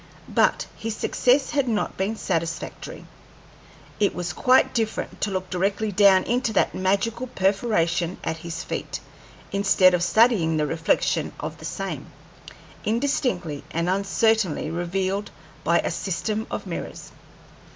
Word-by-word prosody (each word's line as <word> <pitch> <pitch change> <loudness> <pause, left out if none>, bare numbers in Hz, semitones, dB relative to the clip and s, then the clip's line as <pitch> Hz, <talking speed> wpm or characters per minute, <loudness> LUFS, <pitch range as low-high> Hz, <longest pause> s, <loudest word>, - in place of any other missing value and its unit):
But - - +3
his 225 -1 -4
success 260 +5 +2
had 280 -3 +1
not 220 -3 -1
been 195 +4 -1
satisfactory. 165 - -4 0.9
It 205 -2 +2
was 175 -1 -3
quite 255 +9 +4
different 225 -3 -2
to 210 - +1
look 185 -1 -3
directly 195 +4 0
down 195 -1 +6
into 240 -1 0
that 195 - +2
magical 200 +6 0
perforation 190 -5 +1
at 160 - -2
his 165 0 -6
feet, - - -4 0.5
instead 195 -2 +4
of 180 - +2
studying 175 -3 +3
the 150 - +1
reflection 165 +2 0
of - - -5
the - - -9
same, - - -4 0.8
indistinctly 215 - -1
and 170 +2 -1
uncertainly 195 -3 +1
revealed 185 +4 -2 0.3
by - - +3
a - - -2
system 215 +4 -2
of - - -4
mirrors. - - -6
195 Hz, 130 wpm, -24 LUFS, 175-220 Hz, 0.9 s, down